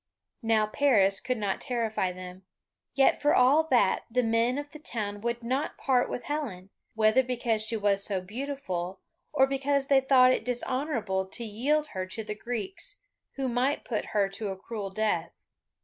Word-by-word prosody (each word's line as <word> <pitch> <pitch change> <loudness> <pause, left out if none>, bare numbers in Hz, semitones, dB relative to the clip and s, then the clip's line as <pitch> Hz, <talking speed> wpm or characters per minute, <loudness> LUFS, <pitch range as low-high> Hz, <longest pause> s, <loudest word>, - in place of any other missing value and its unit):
Now 225 -1 +3
Paris 210 -5 +3
could 255 -1 -2
not 200 -3 -2
terrify 225 -7 -1
them, 185 +1 -9 0.5
yet 270 - +4
for 295 - +4
all 275 +6 +5
that 240 -10 +2
the 250 +2 +1
men 230 +3 +2
of 290 0 -5
the 305 - -10
town 210 -9 -3
would 235 +1 -2
not 260 +5 -2
part 255 -2 +2
with 245 - -4
Helen, 220 -11 -4 0.2
whether 220 +3 +4
because 240 -3 -1
she 225 +1 -1
was 200 -1 +2
so 195 -2 -1
beautiful, 195 -4 -4 0.3
or 265 -3 +4
because 275 +1 0
they 275 -1 +5
thought 255 -1 +6
it - - -1
dishonourable 245 -6 -1
to 235 - -7
yield 290 +8 0
her 185 -1 -4
to 220 +4 -5
the 210 0 -4
Greeks, 245 - -5 0.3
who 270 -1 -2
might 255 +4 0
put 220 - -2
her 205 -2 +1
to 200 +2 -5
a 190 -1 -4
cruel 205 0 -5
death. 190 -5 -2
235 Hz, 175 wpm, -28 LUFS, 205-265 Hz, 0.5 s, thought